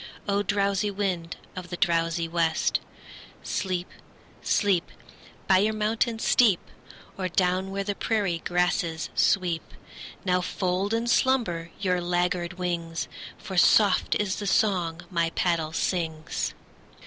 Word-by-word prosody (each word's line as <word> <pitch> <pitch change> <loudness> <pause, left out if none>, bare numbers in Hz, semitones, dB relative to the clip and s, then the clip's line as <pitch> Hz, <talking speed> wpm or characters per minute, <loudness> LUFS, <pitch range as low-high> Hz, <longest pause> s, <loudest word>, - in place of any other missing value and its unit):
O! 200 0 +2
drowsy 200 +1 +1
wind 190 -4 -2 0.2
of 180 -1 -7
the 175 - -5
drowsy 165 -1 +1
west, 165 -1 +1 0.6
Sleep, 185 -2 -2 0.5
sleep, 195 -5 +1 0.6
By 190 -2 +6
your 215 +2 +1
mountain 225 +2 0
steep, 220 -4 +4 0.6
Or 185 -1 -1
down 185 +1 +1
where 195 +1 -2
the 205 +1 -2
prairie 200 -5 0
grasses 175 -2 0
sweep! 175 -4 +2 0.6
Now 180 -1 +2
fold 185 +3 -1
in 230 +1 -1
slumber 235 -10 +1
your 180 -3 +1
laggard 175 0 0
wings, 170 -2 -3 0.3
For 190 - -7
soft 200 +2 +5
is 205 -2 0
the 205 - -4
song 180 -6 +1
my 170 -2 +1
paddle 165 -3 +1
sings. 160 -2 -2
180 Hz, 125 wpm, -26 LUFS, 170-200 Hz, 0.6 s, By